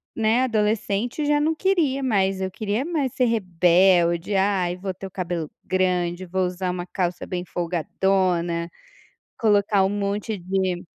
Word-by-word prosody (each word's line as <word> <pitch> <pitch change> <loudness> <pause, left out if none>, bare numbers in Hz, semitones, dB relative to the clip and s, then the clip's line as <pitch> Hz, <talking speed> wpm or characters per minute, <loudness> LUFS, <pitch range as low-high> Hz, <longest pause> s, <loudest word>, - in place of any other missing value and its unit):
né, 225 +3 +2
adolescente, 220 +2 0
já 295 0 +3
não 315 +2 +1
queria 315 -7 +1
mais. 195 -6 +1
Eu 190 0 -2
queria 210 +5 -2
mais 295 -6 -2
ser 255 - 0
rebelde, 180 -3 +3
"ai 190 -2 +1
vou 190 +1 -5
ter 195 +1 -8
o - - -15
cabelo 175 -4 -3
grande, 180 -1 0
vou 185 +1 -1
usar 180 +1 -3
uma 180 -1 -4
calça 180 -1 -3
bem 180 -1 -4
folgadona, 175 0 0 0.7
colocar 205 -2 +3
um 190 - +2
monte 205 +1 -2
de". 185 0 -1
190 Hz, 150 wpm, -23 LUFS, 180-215 Hz, 0.7 s, já